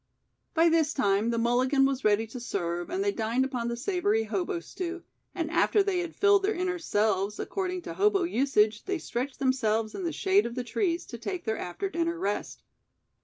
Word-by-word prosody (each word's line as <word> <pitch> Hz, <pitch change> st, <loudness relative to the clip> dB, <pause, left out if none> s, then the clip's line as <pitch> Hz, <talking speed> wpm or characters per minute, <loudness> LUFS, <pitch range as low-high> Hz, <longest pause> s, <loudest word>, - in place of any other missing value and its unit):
By 330 Hz, +1 st, +5 dB
this 320 Hz, -2 st, +2 dB
time 205 Hz, -3 st, +2 dB
the 235 Hz, -, 0 dB
"mulligan" 255 Hz, +4 st, +3 dB
was 270 Hz, -1 st, -1 dB
ready 215 Hz, +1 st, +3 dB
to 225 Hz, +3 st, -8 dB
serve 175 Hz, -7 st, -3 dB
and 380 Hz, +2 st, -1 dB
they 405 Hz, -, +2 dB
dined 235 Hz, -, 0 dB
upon 250 Hz, -3 st, -3 dB
the 235 Hz, 0 st, -2 dB
savory 240 Hz, -, +1 dB
hobo 200 Hz, -5 st, -2 dB
stew, 350 Hz, -, -6 dB, 0.3 s
and 330 Hz, -4 st, -2 dB
after 340 Hz, +4 st, +3 dB
they 390 Hz, -2 st, 0 dB
had 345 Hz, -2 st, -4 dB
filled 405 Hz, -1 st, +4 dB
their 415 Hz, +2 st, 0 dB
inner 360 Hz, 0 st, -1 dB
selves, 210 Hz, -, 0 dB
according 365 Hz, -2 st, -3 dB
to -, -, -6 dB
hobo 400 Hz, -1 st, +3 dB
usage 230 Hz, -9 st, +2 dB
they 385 Hz, -1 st, -1 dB
stretched 260 Hz, -3 st, -4 dB
themselves 225 Hz, -5 st, +1 dB
in 385 Hz, -, -5 dB
the 340 Hz, -, -1 dB
shade 385 Hz, -1 st, +2 dB
of 235 Hz, -, -7 dB
the 250 Hz, -, -2 dB
trees 340 Hz, -, -1 dB
to 235 Hz, -, -9 dB
take 350 Hz, -, -4 dB
their 220 Hz, -1 st, -1 dB
after 180 Hz, -, -3 dB
dinner 335 Hz, -2 st, -1 dB
rest. 205 Hz, -8 st, -3 dB
270 Hz, 200 wpm, -28 LUFS, 225-360 Hz, 0.3 s, By